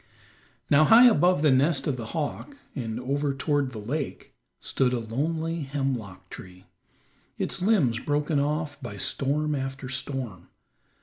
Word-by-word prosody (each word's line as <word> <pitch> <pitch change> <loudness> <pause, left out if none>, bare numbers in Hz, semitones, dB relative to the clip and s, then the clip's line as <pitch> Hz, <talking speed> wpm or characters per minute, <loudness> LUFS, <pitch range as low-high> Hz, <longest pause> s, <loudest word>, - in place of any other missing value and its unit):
Now 150 +2 +5
high 230 +8 +8
above 180 -7 +4
the 150 - +5
nest 140 +4 +2
of 140 - 0
the 115 -3 -6
hawk, 165 - -4 0.2
and 115 -3 -4
over 140 +2 -1
toward 140 -1 0
the 115 - -8
lake, 135 +8 -5 0.3
stood 125 -1 0
a 125 - 0
lonely 160 +9 -2
hemlock 130 -10 -4
tree, 90 0 -11 0.7
its - - -2
limbs 170 - +2
broken 145 +1 0
off 150 0 -2
by 120 -6 -7
storm 150 +7 0
after 135 -1 -4
storm. 125 -8 -5
140 Hz, 140 wpm, -26 LUFS, 125-150 Hz, 0.7 s, high